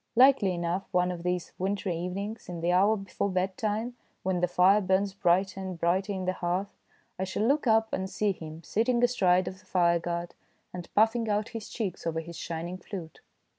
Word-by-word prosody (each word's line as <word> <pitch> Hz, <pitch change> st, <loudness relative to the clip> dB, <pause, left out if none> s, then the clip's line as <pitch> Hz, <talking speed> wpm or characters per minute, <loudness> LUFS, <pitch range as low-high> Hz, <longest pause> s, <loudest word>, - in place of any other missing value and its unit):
Likely 250 Hz, -7 st, +5 dB
enough 175 Hz, +2 st, -2 dB
one 180 Hz, 0 st, +2 dB
of 175 Hz, -1 st, -5 dB
these 180 Hz, 0 st, -2 dB
wintry 190 Hz, -1 st, -1 dB
evenings, 195 Hz, +6 st, -4 dB
in 170 Hz, -2 st, -5 dB
the 170 Hz, +1 st, +1 dB
hour 200 Hz, +5 st, +4 dB
before 195 Hz, 0 st, -3 dB
bedtime, 205 Hz, +5 st, -1 dB, 0.3 s
when 185 Hz, -1 st, 0 dB
the 180 Hz, -, +2 dB
fire 185 Hz, +4 st, +5 dB
burns 190 Hz, +1 st, +1 dB
brighter 190 Hz, 0 st, +2 dB
and 190 Hz, -2 st, -5 dB
brighter 185 Hz, +4 st, +1 dB
in 190 Hz, -2 st, -3 dB
the 185 Hz, -, +1 dB
hearth, 185 Hz, +3 st, -2 dB, 0.4 s
I -, -, 0 dB
shall 190 Hz, +2 st, -2 dB
look 275 Hz, +3 st, +2 dB
up 220 Hz, 0 st, +3 dB
and 190 Hz, 0 st, -2 dB
see 210 Hz, +1 st, +1 dB
him 160 Hz, -2 st, -8 dB
sitting 235 Hz, -, +1 dB
astride 185 Hz, -7 st, +3 dB
of 185 Hz, -, -6 dB
the -, -, -23 dB
fireguard 170 Hz, -1 st, +1 dB, 0.4 s
and 175 Hz, -1 st, -7 dB
puffing 225 Hz, +1 st, +3 dB
out 210 Hz, +1 st, 0 dB
his 225 Hz, -2 st, -7 dB
cheeks 200 Hz, -7 st, -4 dB
over 165 Hz, 0 st, -1 dB
his 170 Hz, +1 st, -8 dB
shining 170 Hz, +3 st, -5 dB
flute. 175 Hz, -4 st, -8 dB
190 Hz, 190 wpm, -28 LUFS, 175-205 Hz, 0.4 s, Likely